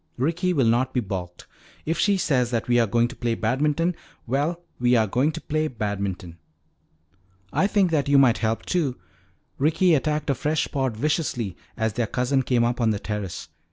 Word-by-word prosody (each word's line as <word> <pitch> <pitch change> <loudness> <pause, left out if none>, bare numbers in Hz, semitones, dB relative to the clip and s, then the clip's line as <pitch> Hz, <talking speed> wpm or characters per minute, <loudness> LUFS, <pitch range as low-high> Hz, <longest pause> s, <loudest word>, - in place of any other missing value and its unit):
Ricky 170 +8 0
will 140 -8 +2
not 120 +4 +1
be - - +3
balked. 95 -5 -5 0.4
If 165 +2 -1
she 200 +1 +3
says 130 -9 +1
that 115 -2 -2
we 120 0 +3
are 115 - +3
going 120 +3 +2
to 130 - -9
play 120 -2 -1
badminton 150 +10 0 0.3
well, 150 +8 -1 0.2
we 125 0 +3
are 110 -2 +4
going 130 +9 +1
to 165 - -5
play 155 0 -1
badminton." 100 - -4 1.1
"I 195 - +3
think 200 -4 +2
that 145 -3 +1
you 140 - +5
might 130 -4 +5
help 110 0 -1
too." 150 -8 0 0.6
Ricky 165 +5 +3
attacked 150 0 +1
a - - +2
fresh 150 +3 -1
pod 130 -5 -1
viciously 125 - -1 0.2
as 110 -2 0
their 120 0 -1
cousin 125 +4 +1
came 125 -2 +1
up 120 +1 0
on 115 - +3
the 105 - +1
terrace. 105 -3 -5
130 Hz, 190 wpm, -24 LUFS, 115-155 Hz, 1.1 s, you